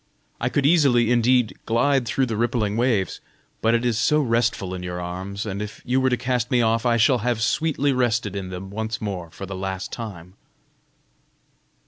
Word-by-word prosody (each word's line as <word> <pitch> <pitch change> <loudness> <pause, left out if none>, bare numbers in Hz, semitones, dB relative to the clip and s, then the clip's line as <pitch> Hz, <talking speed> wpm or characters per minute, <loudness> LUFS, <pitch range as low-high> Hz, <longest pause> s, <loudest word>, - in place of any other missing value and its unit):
I 120 - 0
could 140 +1 0
easily 135 -7 +4
indeed 125 -1 +3
glide 125 +2 +2
through 135 +3 +1
the 115 -3 -3
rippling 110 -2 0
waves, 115 -5 0 0.4
but 115 +1 +3
it 115 +1 0
is 115 -2 +1
so 150 +3 +3
restful 115 -7 0
in 90 - -5
your 90 0 -5
arms, 95 +4 -5
and 100 -1 -4
if 105 0 -6
you 130 +2 +1
were 130 - +3
to 125 - +1
cast 125 -1 -1
me 125 - +2
off, 115 0 +2
I 120 -1 +3
shall 120 +3 +4
have 120 0 -1
sweetly 145 0 +1
rested 115 -5 0
in 95 -2 -4
them 95 +1 -7
once 110 +2 -3
more 95 -5 -4
for 95 - -8
the 95 - -7
last 95 0 -4
time." 95 -7 -7
115 Hz, 190 wpm, -23 LUFS, 100-125 Hz, 0.4 s, easily